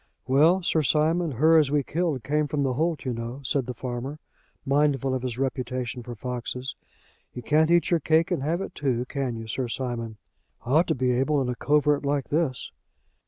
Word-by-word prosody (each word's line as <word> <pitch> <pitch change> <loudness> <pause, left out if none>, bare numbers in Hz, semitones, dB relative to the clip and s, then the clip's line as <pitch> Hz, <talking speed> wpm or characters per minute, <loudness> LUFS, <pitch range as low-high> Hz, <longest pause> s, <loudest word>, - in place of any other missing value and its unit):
"Well, 155 +8 +4
Sir 160 -2 +2
Simon, 155 +2 +1
her 160 +6 +5
as 150 -3 +2
we 145 0 +1
killed 155 -4 -1
came 150 +3 0
from 145 -1 -1
the 130 -2 0
holt, 160 +3 -1
you 130 - -1
know," 115 +4 -6
said 130 -1 -1
the 125 - -3
farmer, 125 +4 -5 0.5
mindful 140 -2 +2
of 130 - -1
his 125 -2 -4
reputation 130 -1 -3
for 120 0 -8
foxes. 125 +2 -5 0.6
"You 125 - -6
can't 155 +5 +3
eat 175 +1 +3
your 170 - +4
cake 160 +2 +2
and - - 0
have 165 +6 -1
it - - -6
too, 125 -4 -1
can 130 -3 -3
you, 115 0 -6
Sir 120 +3 -3
Simon?" 115 -3 -4 0.5
"Ought 155 +8 +3
to - - +1
be 130 -1 +1
able 135 +4 +1
in 130 -2 -1
a 125 - -2
covert 150 +2 +2
like 140 -1 -1
this." 150 -5 -1
135 Hz, 200 wpm, -26 LUFS, 125-150 Hz, 0.6 s, her